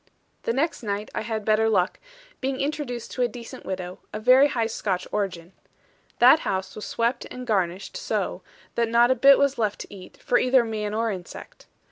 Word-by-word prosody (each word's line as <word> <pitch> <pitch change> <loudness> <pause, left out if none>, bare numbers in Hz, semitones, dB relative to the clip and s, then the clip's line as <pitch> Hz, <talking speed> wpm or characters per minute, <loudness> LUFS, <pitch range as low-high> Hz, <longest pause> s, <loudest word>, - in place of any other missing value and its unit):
The - - -1
next 305 +6 -1
night 205 -1 -4
I - - -2
had 220 -1 -4
better 220 +1 +3
luck, 185 -4 +1 0.4
being 265 0 -2
introduced 280 -5 -3
to 255 - -3
a 245 - +4
decent 235 0 -10
widow, 185 -1 -5
of 215 - -6
very 255 +4 +7
high 235 -5 -1
Scotch 200 -4 -2
origin. 185 -4 -3 0.6
That 255 +6 +7
house 190 0 -3
was 215 - -6
swept 235 +2 -1
and 250 0 -7
garnished 190 -4 -1
so, - - -2 0.3
that 235 -1 0
not 235 +2 +4
a - - +3
bit 275 +3 +7
was 280 -2 +1
left 210 -2 -1
to - - -10
eat, 185 -2 -12
for 245 - +1
either 255 -1 +4
man 215 -2 -3
or 225 0 0
insect. 180 -3 -9
225 Hz, 190 wpm, -25 LUFS, 200-250 Hz, 0.6 s, very